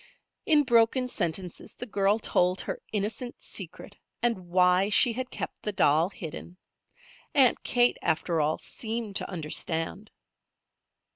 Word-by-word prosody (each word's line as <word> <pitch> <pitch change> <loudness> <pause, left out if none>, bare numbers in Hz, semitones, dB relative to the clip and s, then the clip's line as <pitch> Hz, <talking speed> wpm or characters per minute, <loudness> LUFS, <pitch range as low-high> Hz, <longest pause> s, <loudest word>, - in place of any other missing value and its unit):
In 300 -3 +6
broken 240 0 +3
sentences 180 -5 -3
the 245 - -6
girl 200 -2 +1
told 180 -4 +1
her - - -5
innocent 220 +4 -3
secret, 190 +2 -8 0.3
and 190 -7 -1
why 180 +2 +3
she 230 +3 +5
had 255 +2 -4
kept - - -6
the 210 - -2
doll 160 -2 +3
hidden. 175 -3 -8 0.8
Aunt 265 -4 +5
Kate, 245 -1 +3
after, 160 0 0
all, 150 +1 0
seemed 225 -3 -3
to - - -4
understand. 165 +4 -2
200 Hz, 130 wpm, -27 LUFS, 175-235 Hz, 0.8 s, In